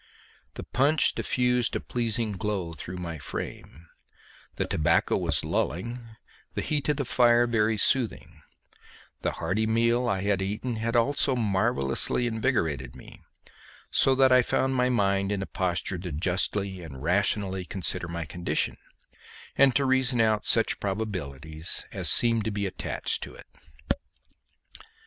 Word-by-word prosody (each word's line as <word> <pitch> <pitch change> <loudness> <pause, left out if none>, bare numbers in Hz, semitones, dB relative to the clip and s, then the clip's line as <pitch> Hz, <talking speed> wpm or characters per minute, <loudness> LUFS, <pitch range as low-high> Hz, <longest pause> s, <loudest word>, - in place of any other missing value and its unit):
The - - -6
punch 140 +5 +2
diffused 125 -2 0
a - - 0
pleasing 115 -2 -1
glow 100 -4 -3
through 90 +4 -7
my 85 -3 -5
frame, 70 +2 -7 0.7
the - - -1
tobacco 75 - +2
was - - +1
lulling, 120 +10 -2 0.6
the - - -2
heat 150 -1 -2
of 150 - +1
the 140 - -2
fire 120 -1 +4
very 110 -2 +1
soothing, 90 - 0 0.8
the - - -1
hearty 110 +3 -1
meal 115 +2 +2
I 95 -3 0
had 100 -1 0
eaten 105 +5 -3
had 115 +2 -2
also 135 +2 +2
marvellously 95 - +1
invigorated 110 - -1
me, - - -14 0.7
so 135 - +3
that 130 0 +4
I 130 0 +7
found 130 +2 0
my 125 -1 +2
mind 100 -4 +1
in 100 -2 -1
a - - -4
posture 90 0 -2
to 90 0 -6
justly 95 +4 -1
and 70 -5 -9
rationally 95 +2 +1
consider 90 -1 -2
my 85 0 -4
condition, 85 +3 -2 0.8
and 135 -2 +5
to 140 - +3
reason 130 -2 +2
out 110 -2 +2
such 115 - +3
probabilities 80 -7 -3
as - - 0
seemed 115 -2 +5
to 110 - -1
be 100 0 -2
attached 95 - -3
to - - -8
it. - - -13
105 Hz, 145 wpm, -27 LUFS, 90-120 Hz, 0.8 s, I